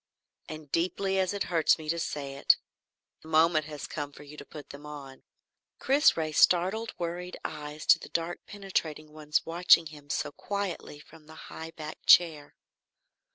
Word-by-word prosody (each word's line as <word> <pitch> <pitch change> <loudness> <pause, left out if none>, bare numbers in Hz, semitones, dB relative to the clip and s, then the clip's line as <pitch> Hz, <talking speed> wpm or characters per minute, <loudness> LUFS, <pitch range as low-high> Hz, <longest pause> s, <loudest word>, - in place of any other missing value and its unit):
And 155 -2 -9
deeply 190 +3 0
as 185 -1 +1
it 200 -1 -2
hurts 165 -3 +2
me 155 -1 -10
to 170 +1 0
say 140 -4 -4
it, 140 - +4 0.6
the - - -15
moment 160 -1 +3
has 150 -1 -7
come 145 -2 -5
for 145 - -13
you 145 +1 -12
to 145 - -9
put 145 0 -11
them 140 +1 -11
on." 140 -3 -10 0.6
Chris 280 - +4
raised 155 -2 -1
startled 195 +6 +3
worried 175 +1 -5
eyes 150 0 -6
to - - +6
the - - -11
dark 170 +1 -3
penetrating 160 -7 -4
ones 150 -1 -1
watching 170 0 +5
him 145 -2 -12
so 140 - -2
quietly 195 -4 -5
from 155 0 -17
the 160 - -13 0.2
high 160 0 -7
backed 155 -1 -9
chair. 155 -4 +5
160 Hz, 170 wpm, -29 LUFS, 150-175 Hz, 0.6 s, to